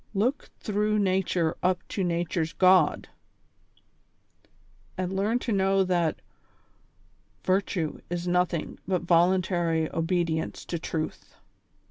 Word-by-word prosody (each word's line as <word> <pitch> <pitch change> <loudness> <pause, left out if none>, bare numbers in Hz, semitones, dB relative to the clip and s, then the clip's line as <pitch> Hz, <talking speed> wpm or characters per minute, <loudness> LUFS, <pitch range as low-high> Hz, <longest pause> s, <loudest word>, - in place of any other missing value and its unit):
" - - -36
Look 270 +3 -2
through 210 0 0
nature 185 -4 +1
up 180 0 0
to 195 - -2
nature's 170 -1 -1
God," 185 -4 +4 1.9
and 185 +1 -2
learn 210 +5 +1
to 245 - -3
know 195 -1 +3
that 175 -4 0 0.6
" - - -38
Virtue 185 -4 0
is 175 0 -3
nothing 180 -2 0
but 185 -2 0
voluntary 175 -2 +2
obedience 165 -1 -1
to 170 - -3
truth." 160 -1 -5
180 Hz, 110 wpm, -27 LUFS, 170-190 Hz, 1.9 s, God